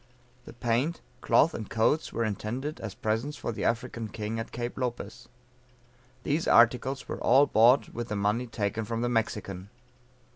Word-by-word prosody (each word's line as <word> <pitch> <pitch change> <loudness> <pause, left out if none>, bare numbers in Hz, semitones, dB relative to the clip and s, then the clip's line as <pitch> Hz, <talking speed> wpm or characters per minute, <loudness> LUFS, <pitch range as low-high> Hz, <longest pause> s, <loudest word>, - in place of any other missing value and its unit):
The - - -11
paint, 120 +7 0 0.2
cloth 165 +2 +4
and 110 - -6
coats 115 +8 +1
were 115 - -1
intended 120 +8 -4
as 105 -3 -6
presents 115 +7 -2
for - - -3
the 110 - -5
African 115 -1 -1
king 110 +1 -4
at 115 - -6
Cape 120 0 -4
Lopez. 120 -4 -5 0.9
These 155 +4 0
articles 125 +3 +3
were - - -5
all 135 +4 +5
bought 125 +1 +4
with 120 0 -5
the 105 - -3
money 105 +5 0
taken 110 -1 -2
from 115 +1 -3
the 120 - 0
Mexican. 100 -5 -2
115 Hz, 160 wpm, -28 LUFS, 110-125 Hz, 0.9 s, all